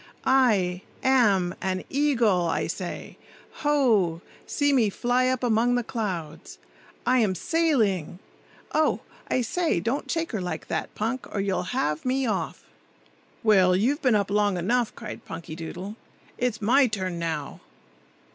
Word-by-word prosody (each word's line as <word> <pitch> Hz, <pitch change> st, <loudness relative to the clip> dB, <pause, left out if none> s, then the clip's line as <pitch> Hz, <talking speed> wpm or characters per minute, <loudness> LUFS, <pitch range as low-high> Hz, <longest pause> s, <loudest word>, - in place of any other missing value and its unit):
"I—am—an 195 Hz, -4 st, +2 dB
eagle, 235 Hz, -11 st, +2 dB
I 165 Hz, -, 0 dB
say. -, -, -6 dB, 0.4 s
Ho! 225 Hz, -, +2 dB, 0.2 s
see 285 Hz, -1 st, +1 dB
me 235 Hz, -6 st, +4 dB
fly 245 Hz, +5 st, +1 dB
up 255 Hz, -1 st, 0 dB
among 240 Hz, +1 st, +3 dB
the 245 Hz, -, 0 dB
clouds! 185 Hz, -10 st, -5 dB, 0.5 s
I 255 Hz, 0 st, +4 dB
am 205 Hz, -5 st, +2 dB
sailing—Oh, 240 Hz, -, -1 dB, 0.3 s
I 255 Hz, -, +2 dB
say! 325 Hz, -, 0 dB
don't 230 Hz, +10 st, -2 dB
shake 330 Hz, 0 st, -1 dB
her 215 Hz, -5 st, -2 dB
like 175 Hz, -3 st, -5 dB
that, -, -, -3 dB
Punk, 230 Hz, +4 st, -2 dB
or 205 Hz, -, -2 dB
you'll 195 Hz, +3 st, -1 dB
have 150 Hz, -, 0 dB
me 260 Hz, +1 st, 0 dB
off!" 220 Hz, -, -2 dB, 0.8 s
"Well, 190 Hz, -5 st, +5 dB
you've 260 Hz, -, +1 dB
been 250 Hz, -4 st, +3 dB
up 200 Hz, -1 st, 0 dB
long 205 Hz, -2 st, +2 dB
enough!" 235 Hz, +7 st, 0 dB
cried -, -, -8 dB
Punkydoodle. 165 Hz, +4 st, -7 dB, 0.4 s
"It's 240 Hz, -3 st, -1 dB
my 255 Hz, +5 st, +5 dB
turn 185 Hz, -5 st, -3 dB
now. 160 Hz, -4 st, -3 dB
215 Hz, 130 wpm, -26 LUFS, 185-255 Hz, 0.8 s, Well